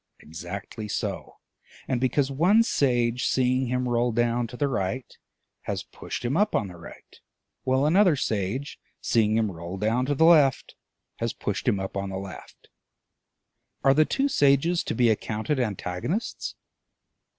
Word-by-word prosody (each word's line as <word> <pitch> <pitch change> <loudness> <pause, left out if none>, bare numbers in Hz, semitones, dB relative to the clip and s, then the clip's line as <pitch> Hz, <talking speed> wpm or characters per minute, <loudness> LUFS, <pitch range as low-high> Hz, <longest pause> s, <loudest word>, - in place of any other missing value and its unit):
Exactly 90 +7 -7
so; 100 - -4 0.5
and 125 -2 -1
because 135 +2 +1
one 180 +11 +4
sage, 125 - +1
seeing 130 0 +1
him 125 +1 -1
roll 120 0 +1
down 120 +1 +1
to 125 - -10
the 145 - +1
right, 120 0 -3 0.5
has - - -3
pushed - - -7
him 125 +4 0
up 210 +4 +2
on 105 -4 0
the 90 - -11
right, 85 - -14 0.5
while 130 +2 +2
another 180 +1 +4
sage, 110 +3 -2 0.2
seeing 110 -2 +2
him 110 -3 +1
roll 85 +2 -7
down 115 +6 0
to 145 - 0
the 160 - +4
left, 150 -6 +4 0.4
has - - -2
pushed - - -4
him 100 - +2
up 95 0 -5
on 100 0 -3
the 95 - -4
left, 95 -3 -10 1.2
are 135 0 +6
the 155 +3 +5
two 270 - 0
sages 160 - +3
to - - -3
be 120 +1 +3
accounted 110 +6 -2
antagonists? 110 - -3
125 Hz, 155 wpm, -26 LUFS, 105-140 Hz, 1.2 s, are